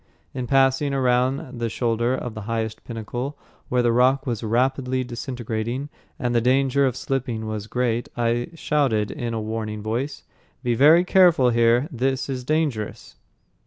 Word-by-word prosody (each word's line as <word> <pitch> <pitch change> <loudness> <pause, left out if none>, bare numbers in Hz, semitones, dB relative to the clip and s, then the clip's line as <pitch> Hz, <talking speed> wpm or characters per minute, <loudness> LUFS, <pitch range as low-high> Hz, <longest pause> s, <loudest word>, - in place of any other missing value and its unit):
In 125 -2 -4
passing 135 +1 +3
around 130 0 0
the 115 -1 -1
shoulder 120 +2 0
of 125 -3 -5
the 110 - -7
highest 110 -1 -3
pinnacle, 120 +5 -5 0.3
where 125 -1 +2
the 120 - +3
rock 130 +4 +3
was 120 -5 -2
rapidly 130 +3 0
disintegrating 120 +1 -4 0.3
and 120 -1 -1
the 120 - +3
danger 135 +2 +3
of 125 - -2
slipping 125 -5 -2
was 110 -1 -4
great, 120 0 -1
I 120 0 0
shouted 130 -10 0
in 120 -5 -4
a - - -1
warning 110 -1 -4
voice, 120 +7 -3 0.4
"Be 120 -1 +1
very 155 +8 +6
careful 175 -9 +5
here, 120 +3 +3
this 135 +1 -1
is 130 -2 -3
dangerous." 145 -7 -2
125 Hz, 155 wpm, -23 LUFS, 115-135 Hz, 0.4 s, very